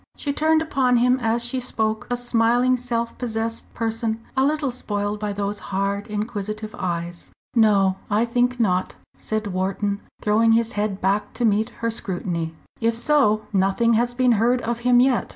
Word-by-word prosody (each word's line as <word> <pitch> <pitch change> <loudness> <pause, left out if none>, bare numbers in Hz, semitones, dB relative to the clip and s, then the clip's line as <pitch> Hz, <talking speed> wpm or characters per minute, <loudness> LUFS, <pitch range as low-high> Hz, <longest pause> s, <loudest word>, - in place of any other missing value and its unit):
She 285 - -2
turned 315 +2 +2
upon 260 -5 +2
him 250 +2 +3
as 235 0 0
she 255 +2 -2
spoke 220 -3 -1
a 245 - 0
smiling, 245 +1 +2
self 235 -2 -3
possessed 225 -1 -3
person 225 -1 -1 0.2
a 265 - +3
little 295 -1 +1
spoilt 205 -3 -3
by 210 -1 -2
those 200 0 -3
hard, 200 +1 -1
inquisitive 215 0 -4
eyes. 170 -1 -4 0.3
"No, 200 -4 +4
I 215 +3 +2
think 245 +1 0
not," 185 -5 +1 0.2
said 215 0 -3
Wharton, 195 +2 -1 0.2
throwing 225 +2 +3
his 230 0 +2
head 205 -3 -2
back 195 +3 0
to 240 - -1
meet 215 0 +2 0.2
her 230 - +1
scrutiny. 175 -6 -3 0.2
"If 230 0 +1
so, 230 -4 +2
nothing 195 +5 +2
has 240 +2 +1
been 250 -1 +3
heard 245 +2 +3
of 235 0 -2
him 245 0 +4
yet. 255 -1 +2
225 Hz, 170 wpm, -23 LUFS, 205-245 Hz, 0.3 s, No